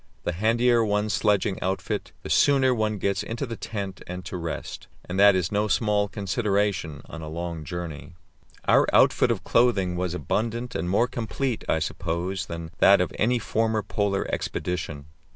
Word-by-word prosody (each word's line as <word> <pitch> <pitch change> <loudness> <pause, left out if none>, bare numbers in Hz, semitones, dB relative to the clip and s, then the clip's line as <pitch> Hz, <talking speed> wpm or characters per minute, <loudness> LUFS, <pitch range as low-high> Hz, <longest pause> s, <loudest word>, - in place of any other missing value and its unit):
The - - -1
handier 115 +5 +3
one's 105 0 0
sledging 105 -2 +1
outfit, 95 +1 -2
the - - -7
sooner 135 -3 +4
one 110 -2 0
gets 100 0 0
into 115 +4 -4
the 115 -2 -5
tent 100 -3 -5
and 90 0 -6
to 95 - -6
rest, 85 -2 -5 0.2
and 90 +2 -3
that 100 -1 +7
is 90 -3 0
no 105 +1 +1
small 105 -1 +2
consideration 100 - -1
on 80 - -9
a 80 - -6
long 85 0 -5
journey. 85 -2 -6 0.5
Our - - +5
outfit - - +5
of - - -1
clothing 100 -7 +2
was 90 -1 -2
abundant 115 +6 -2
and 85 +2 -2
more 105 +6 +3
complete, 120 +1 -3
I - - +3
suppose, 85 +4 -3
than 85 -1 -6
that 100 - +7
of 90 - -1
any 120 +3 +3
former 110 -2 0
Polar 100 -2 -1
expedition. 80 -5 -3
100 Hz, 170 wpm, -25 LUFS, 90-110 Hz, 0.5 s, that